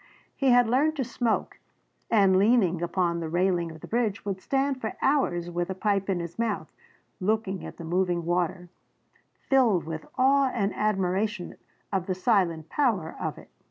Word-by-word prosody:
He 275 -2 +1
had 245 -1 +5
learned 285 +7 +2
to 275 - -1
smoke, 235 -1 -2 0.5
and 195 -4 +4
leaning 200 -6 +3
upon 170 0 0
the 165 -1 -4
railing 175 0 +1
of 160 -1 -11
the - - -9
bridge 225 -4 -1
would 195 -2 -3
stand 270 +1 0
for 220 - -4
hours 175 -12 +1
with 175 +1 -2
a 190 - -3
pipe 200 0 0
in 185 -2 +1
his 170 +4 -7
mouth 225 -3 -2 0.5
looking 200 -1 -1
at - - -8
the 170 - -8
moving 175 0 0
water, 175 +1 -1 0.8
filled 235 - +3
with 160 +1 -6
awe 270 +1 +4
and 200 -3 0
admiration 195 -1 -1 0.4
of 190 -1 -1
the 185 - -1
silent 180 -6 +1
power 215 - 0
of - - -3
it. - - -15
195 Hz, 170 wpm, -27 LUFS, 175-230 Hz, 0.8 s, had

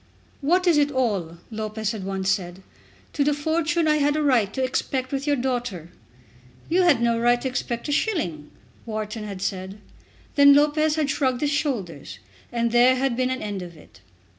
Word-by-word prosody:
"What 355 +6 +2
is 335 -4 +4
it 290 0 +3
all," 200 -11 -1
Lopez 215 -1 -3
had 215 -4 -6
once 190 0 -3
said, 185 -1 -1 0.5
"to 290 - +1
the 295 0 +1
fortune 315 +2 0
I 305 0 +3
had 290 0 +2
a 305 - 0
right 240 -8 +2
to 265 - -2
expect 260 0 -2
with 275 +1 -3
your 290 - +3
daughter?" 245 - -3 0.8
"You 360 +3 +3
had 290 -10 +4
no 235 -1 +2
right 240 +1 +3
to - - -2
expect 250 -1 -3
a - - -2
shilling," 235 - -1 0.4
Wharton 215 0 -4
had 195 -2 -6
said. 190 0 -4 0.6
Then 280 0 +7
Lopez 300 +1 +3
had 300 -3 0
shrugged 260 -3 0
his 290 -1 +1
shoulders, 195 - -3 0.3
and 235 -1 0
there 245 +2 +5
had 260 -1 0
been 255 +1 0
an 260 0 -3
end 205 -2 -4
of 175 -2 -9
it. 150 - -18
250 Hz, 190 wpm, -24 LUFS, 205-290 Hz, 0.8 s, Then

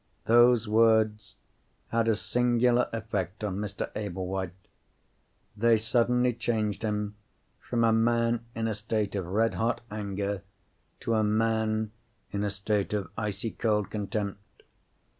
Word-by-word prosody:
Those 120 0 +5
words 110 -1 +3 0.5
had 115 0 +1
a 110 - +4
singular 120 +2 +2
effect 105 -3 -3
on 100 -3 -2
Mr. 105 -1 -4
Ablewhite. 95 -2 -3 1.1
They 115 +1 +4
suddenly 125 +2 +2
changed 110 -3 -1
him 105 -1 -1 0.5
from 120 -1 -1
a 115 -1 +4
man 115 +1 +2
in 115 0 -1
a 110 - 0
state 105 0 -2
of 95 -4 -2
red 110 +5 +1
hot 115 +1 0
anger 100 -1 -3 0.6
to 115 - -1
a 110 -1 +3
man 110 0 +1 0.4
in 100 0 -1
a 105 - 0
state 100 +1 -1
of 105 -2 -2
icy 105 0 -3
cold 105 -3 0
contempt. 100 -1 -4
110 Hz, 130 wpm, -28 LUFS, 105-115 Hz, 1.1 s, Those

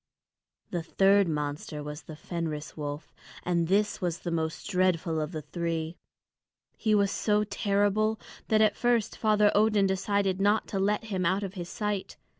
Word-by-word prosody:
The 175 - -1
third 195 +3 +3
monster 150 -1 -3
was 150 +1 -6
the 155 - -10
Fenris 155 -2 -5
wolf, 145 0 -6 0.3
and 170 -2 +1
this 205 +3 +1
was 175 -2 -1
the 170 - -3
most 160 -1 -2
dreadful 180 -3 +1
of 155 +1 -3
the 155 -3 -5
three. 165 -1 -3 0.8
He 215 -1 +1
was 200 -1 +3
so 210 -1 +1
terrible 205 +1 +1 0.3
that 220 -1 +3
at 215 -1 +4
first 240 -3 +1
Father 210 -1 +3
Odin 210 -1 +4
decided 195 0 0
not 205 +2 +3
to 195 - -2
let 205 +3 +1
him 195 -4 -2
out 190 +3 +1
of 195 -1 -5
his 175 -3 -6
sight. 210 -2 -3
190 Hz, 165 wpm, -28 LUFS, 165-205 Hz, 0.8 s, at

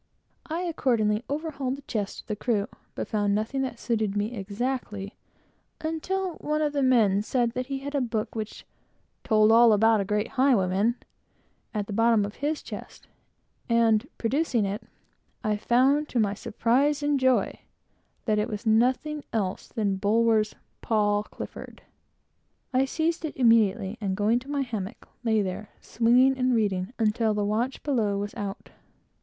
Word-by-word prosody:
I 325 +2 -2
accordingly 235 -10 +1
overhauled 280 -3 -2
the 280 - -12
chests 210 -6 -3
of - - -35
the 210 - -3
crew, 210 -2 0 0.3
but - - -4
found 205 -1 +1
nothing 220 +6 -1
that 255 -3 -3
suited 215 -4 -1
me 210 +4 -1
exactly, 210 0 -4 0.6
until 355 +3 -2
one 305 +1 -1
of 295 -1 0
the 285 - 0
men 225 -7 +4
said 235 +2 0 0.2
he 275 -1 -3
had 280 +2 -6
a 285 - +1
book 225 -3 -2
which 220 -1 -6 0.6
"told 215 -1 +4
all 230 0 +7
about 220 0 +4
a - - 0
great 210 +3 -1
highway 255 -8 +3
man," 205 +6 +1 0.8
at 210 -3 -2
the 205 - -6
bottom 225 -1 +3
of 205 - -8
his 295 +2 -2
chest, - - -9 0.6
and 230 -2 +3
producing 245 -2 +1
it, 200 +2 -3 0.6
I 215 -1 +1
found, 265 +7 +2
to 245 - 0
my 205 -2 +2
surprise 250 +7 +1
and 290 -1 +2
joy, 260 -1 +2 0.7
that 215 -2 +2
it 210 - 0
was 215 +1 -5
nothing 255 +7 +2
else 200 -5 -2
than 205 -4 -1
Bulwer's 215 +1 +2 0.3
Paul 205 -2 +2
Clifford. - - -9 0.9
This, 255 - +4
I - - +3
seized 325 +4 -1
immediately, 225 -7 +2
and 190 -2 -1
going 215 +3 +2
to 260 +3 -14
my 285 -1 0
hammock, 225 -4 -5 0.2
lay 220 -3 +2
there, 195 +2 -5
swinging 250 +3 +3
and 255 -1 +2
reading, 195 -3 0
until 220 0 +1
the 205 -1 0
watch 230 +6 -1
was 205 -7 0
out. 200 0 -6
230 Hz, 160 wpm, -26 LUFS, 210-265 Hz, 0.9 s, all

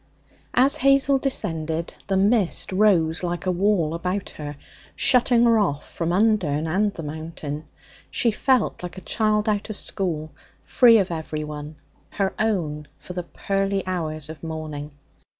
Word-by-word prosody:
As 265 +3 +4
Hazel 275 +1 +4
descended 165 - -2
the 195 -1 +1
mist 200 -2 +1
rose 185 -5 +3
like 175 0 -3
a 185 - +2
wall 180 -4 +1
about 180 +3 -3
her, 145 -1 -7 0.4
shutting 245 -2 +4
her 230 -2 +5
off 150 -8 -1
from 165 0 -1
Undern 180 -7 +2
and 200 +6 +1
the 165 - -8
Mountain. 155 -1 -6 0.4
She 235 - +2
felt 255 +2 +1
like 180 +1 -7
a - - -7
child 215 +2 +1
out 210 0 0
of 215 - -5
school, 155 -5 -2 0.3
free 235 -3 +6
of 190 -4 +1
everyone, 150 -2 -5 0.3
her 195 -2 -1
own 165 -9 -1
for 180 - -9
the 180 - -3
pearly 195 +2 -2
hours 155 -5 -3
of 160 0 -9
morning. 155 -2 -6
180 Hz, 150 wpm, -23 LUFS, 155-210 Hz, 0.4 s, free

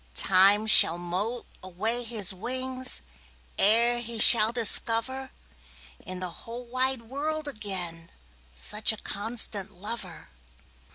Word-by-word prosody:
Time 195 +3 +4
shall 195 -5 +6
moult 190 +8 -5 0.2
away 215 +7 -2
his 220 -4 -3
wingsEre 230 - -2
he 235 0 -7
shall 220 0 +7
discoverIn 240 +3 0 0.9
the 185 - -4
whole 230 +8 -10
wide 255 0 -1
world 300 +6 -6
againSuch 170 - -3
a 220 - -8
constant 210 -2 0
lover. 210 +6 -10
220 Hz, 95 wpm, -24 LUFS, 185-240 Hz, 0.9 s, shall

